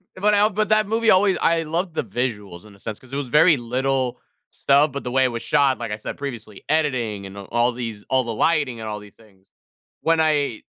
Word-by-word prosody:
But 210 +3 +2
I 205 +1 +4
but 215 +1 -1
that 215 -1 +3
movie 225 +1 +2
always 190 0 +4
I 165 0 +2
loved 170 +3 -3
the - - -1
visuals 105 -7 -4
in 105 -2 -15
a - - -21
sense 110 +1 -6
'cause 130 0 -17
it - - -2
was 140 -3 -3
very 155 +5 +5
little 130 +1 -1 0.3
stuff, 145 +2 +3
but 140 +1 -6
the 125 - -4
way 130 +1 +3
it - - +4
was 115 -1 -5
shot, 140 -3 +2
like 115 -3 -5
I - - -1
said 105 - -7
previously, 115 -7 -7
editing 125 -10 0
and 95 +1 -10
all 120 +5 0
these 115 -4 -6
all 130 -1 +2
the 115 -1 -4
lighting 140 -2 +1
and 110 -1 -5
all 105 0 -4
these 105 -1 -15
things. 100 -4 -24 0.5
When 165 0 +2
I 145 -7 +1
130 Hz, 235 wpm, -22 LUFS, 110-160 Hz, 0.5 s, very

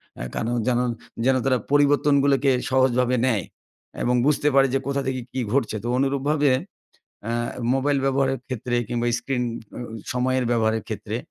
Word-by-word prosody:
অ্যা - - -6
কারণ 120 +2 -1
যেন 125 -1 +2 0.5
যেন 130 0 +4
তারা 130 -2 +3
পরিবর্তনগুলোকে 140 -1 +3 0.2
সহজভাবে 125 -1 +2
নেয় 110 -8 +1 0.6
এবং 125 +1 +2
বুঝতে 150 0 +2
পারে 135 0 +6
যে, 135 - +2
কোথা 140 0 0
থেকে 130 -1 -2
কি 130 - -3
ঘটছে? 130 -5 0
তো 120 - -3
অনুরূপভাবে 140 +2 +1 0.8
অ্যা 115 +1 -2 0.4
মোবাইল 140 +1 +1
ব্যবহারের 135 0 +1
ক্ষেত্রে 125 -1 -3
কিংবা 120 0 -1
স্ক্রিন 125 -1 -2 0.3
অ্যা - - -7
অ - - -11 0.2
সময়ের 130 +1 0
ব্যবহারের 110 -2 +1
ক্ষেত্রে, - - -4
130 Hz, 155 wpm, -23 LUFS, 125-140 Hz, 0.8 s, পারে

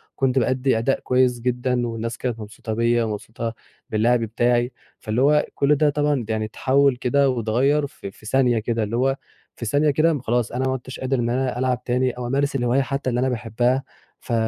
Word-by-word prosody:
كنت 135 -1 +2
بأدّي 130 0 +1
أداء 125 +4 +1
كويس 125 -1 +2
جدًا، 125 0 0
والناس 115 0 -4
كانت 120 -3 -3
مبسوطة 110 +2 -6
بيّا 115 +1 +2
ومبسوطة 110 +1 -4 0.4
باللعب 115 +3 +2
بتاعي 120 +2 +1 0.3
فاللي 110 +3 -1
هو 150 +2 +4
كل 145 +1 +3
ده 150 +1 +3
طبعًا 145 -4 0
يعني 110 -1 -1
اتحوّل 135 +5 +2
كده 135 +3 +2
واتغيّر 130 +5 +1
في 100 - -9
في 110 - -19
ثانية 125 0 +2
كده، 115 0 -1
اللي 110 +3 -2
هو 135 +2 +2 0.4
في 115 - -6
ثانية 145 +6 +2
كده 155 +4 +3
م 145 - -2
خلاص 120 -1 0
أنا 130 +2 -1
ما 130 - 0
عُدتش 130 0 -7
قادر 130 0 -1
إن 120 0 0
أنا 125 0 -1
ألعب 125 -1 0
تاني 125 +1 +1
أو 125 0 -6
أمارس 140 +2 0
الهواية 125 +1 +2
حتى 135 0 -2
اللي 120 -1 0
أنا 130 +1 +1
باحبها، 120 +2 0 0.4
ف 120 - -5
125 Hz, 200 wpm, -22 LUFS, 115-135 Hz, 0.4 s, هو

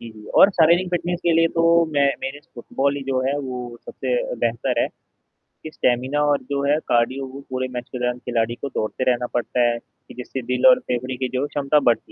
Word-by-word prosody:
जी, 115 - -9
जी, 110 -1 -14
और 200 - +7
शारीरिक 175 +1 +3
फिटनेस 175 0 -1
के 170 - +2
लिए 165 0 +4
तो 170 0 +4
मैं 140 -1 +3
मेरे 135 +2 -5
फुटबॉल 140 +3 -1
ही 140 - -5
जो 130 -1 +1
है, 140 +2 0
वो 125 -3 -6
सबसे - - -4 0.2
अ, - - -2
बेहतर - - 0
है - - +1 0.8
कि 155 - -7
स्टैमिना 130 +1 0
और 145 - +1
जो 140 0 -1
है 145 +1 +3
कार्डियो 130 +3 +1
वो 135 +1 -9
पूरे 130 0 -2
मैच 125 0 -5
के 125 - -6
दौरान 125 0 -1
खिलाड़ी 120 -2 -1
को 140 - -6
दौड़ते 120 +1 -3
रहना 125 0 0
पड़ता 120 +1 -1
है 120 0 -1
कि - - -19
जिससे 125 +1 -6
दिल 125 - +3
और 255 -1 +8
फेफड़े 130 - -3
की 130 0 -2
जो 130 0 -2
है - - 0
क्षमता 145 +1 +1
बढ़ती 120 - 0
130 Hz, 230 wpm, -22 LUFS, 125-150 Hz, 0.8 s, और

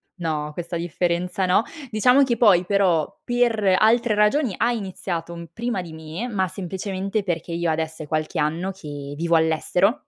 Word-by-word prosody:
no, 155 -4 -2
questa 170 0 -4
differenza 175 +2 -1
no. 180 +4 +4 0.3
Diciamo 250 +6 +5
che 240 -3 +1
poi 195 -6 +5
però 195 -3 +1
per 225 -6 +2
altre 225 0 +3
ragioni 210 +1 +2
ha 240 - +2
iniziato 185 -6 -4
un 170 0 -8
prima 230 -5 -2
di 165 -2 -10
me, 160 +9 -6
ma 190 -5 0
semplicemente 190 +2 -3
perché 175 -3 -3
io 170 0 -1
adesso 160 0 -2
è 150 - -7
qualche 155 0 -2
anno 165 +6 -1
che 145 -6 -8
vivo 170 +2 +1
all'estero 180 - +2
180 Hz, 165 wpm, -23 LUFS, 165-210 Hz, 0.3 s, Diciamo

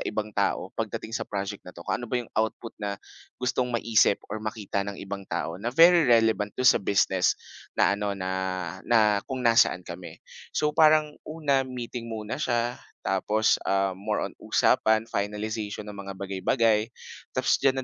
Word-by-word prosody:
ibang 105 -1 -3
tao - - -1
pagdating 110 - -4
sa - - -3
project 100 0 -4
na 90 - -13
'to. 85 - -10
Kung - - -2
ano 120 - -6
ba 125 - 0
yung 120 -2 -5
output 110 +1 -2
na 100 -1 -3 0.4
gustong 125 0 0
maisip 115 -3 +3 0.2
or 110 - -4
makita 110 -2 -3
ng 100 0 -4
ibang 100 0 -7
tao, 85 +1 -3
na 115 - -2
very 165 +3 +6
relevant 110 -3 +3
do'n 130 - -1
sa 125 - +6
business 95 -2 +2 0.4
na - - +4
ano, 100 -1 -2
na, 95 -1 -3 0.6
na 105 -3 +4
kung 130 -2 -4
nasaan 115 -6 +4
kami. 85 +1 -9 0.4
So, 150 0 +2
parang 155 -1 +5 0.2
una, 150 -4 +1
meeting 120 -1 -6
muna 110 +5 -5
siya, 120 -1 0 0.2
tapos, 105 +3 +2
um, 95 0 +2
more 105 +3 -2
on - - -5
usapan, 110 0 +3
finalization 105 0 -3
ng 105 - -8
mga 100 -1 -7
bagay-bagay, 105 +3 +1 0.5
tapos 130 0 +2
diyan 135 -1 +3
110 Hz, 170 wpm, -26 LUFS, 100-120 Hz, 0.6 s, very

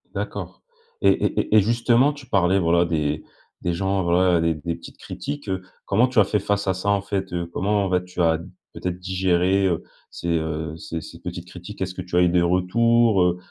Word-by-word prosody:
D'accord - - -5 0.4
et - - +5
et - - 0
et - - +1
et - - +7
justement, 120 +6 +3
tu 145 -3 -13
parlais 95 -3 +3
voilà, 85 0 +3
des 75 -2 -1 0.4
des 90 - -1
gens 95 +2 0
voilà, 90 0 +3
des 85 0 +2
des 85 +2 -4
petites - - -13
critiques, 145 -3 -6
heu. 95 0 -1 0.2
Comment 110 +6 +3
tu 125 -3 +1
as - - +8
fait 105 +2 0
face 100 0 -1
à 95 - +3
ça 95 +2 -3
en 100 -1 +2
fait, 100 -1 -3
heu? 85 -1 -1
Comment, 100 0 +1
bah, 90 -1 +2
tu 90 0 -5
as 80 -1 +3 0.3
peut-être 90 0 -4
digéré, 95 +1 +1
heu, 85 -3 -1 0.3
ces, - - -7
heu, 80 -1 -2
ces 80 0 -6
ces - - -11
petites 90 0 -7
critiques? 90 +3 -10
Est-ce 95 -1 -2
que 90 - -6
tu 90 -1 -6
as 90 - +5
eu 90 - +4
des 90 0 +3
retours, 105 +5 +3
heu, 90 0 +2
90 Hz, 220 wpm, -23 LUFS, 85-100 Hz, 0.4 s, as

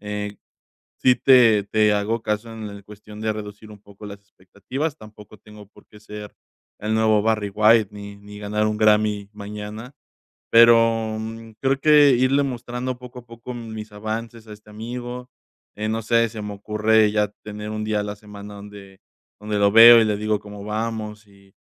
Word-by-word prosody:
eh, 105 0 -5 0.6
sí 125 - +5
te 120 -6 +5
te 105 +1 +2
hago 110 +3 -1
caso 105 +2 -3
en 110 -1 -7
la 100 0 -11
cuestión 105 +1 -13
de 110 0 -1
reducir 105 0 -9
un 105 - -13
poco 100 0 -16
las 100 0 -9
expectativas, 100 - -6
tampoco 105 -2 -15
tengo 105 0 -15
por - - -21
qué 105 - -18
ser 105 -1 -10 0.5
el 105 +1 -2
nuevo 110 -1 +3
Barry 110 -2 0
White 110 +1 +4
ni 100 0 -10
ni 105 0 -13
ganar 105 +1 -1
un 110 0 -1
Grammy 105 -1 +2
mañana, 105 +3 -8 0.6
pero, 115 -1 +5
mm, 115 0 -8
creo 135 0 +1
que 150 -2 +6
irle 130 +3 +2
mostrando 125 0 -5
poco 125 0 -11
a 120 - -17
poco 115 +1 -10
mis 110 -3 -8
avances 110 +2 -6
a 105 - -9
este 105 0 -17
amigo, 120 +3 -7 0.5
eh, 105 +1 -3
no 110 +1 -2
sé, 115 +1 +2
se 110 -1 -8
me 105 0 -6
ocurre 105 +1 +2
ya 105 -1 +1 0.2
tener 105 0 -7
un 110 0 -4
día 110 -1 -1
a - - -4
la 105 0 -5
semana 105 0 -12
donde 100 -1 -13 0.4
donde 105 -1 -2
lo 100 0 +4
veo 115 +1 +9
y 110 - +2
le 105 - 0
digo 105 0 -1
cómo 105 -1 -11
vamos 110 0 -5
y, 100 -1 -23
105 Hz, 185 wpm, -22 LUFS, 105-115 Hz, 0.6 s, veo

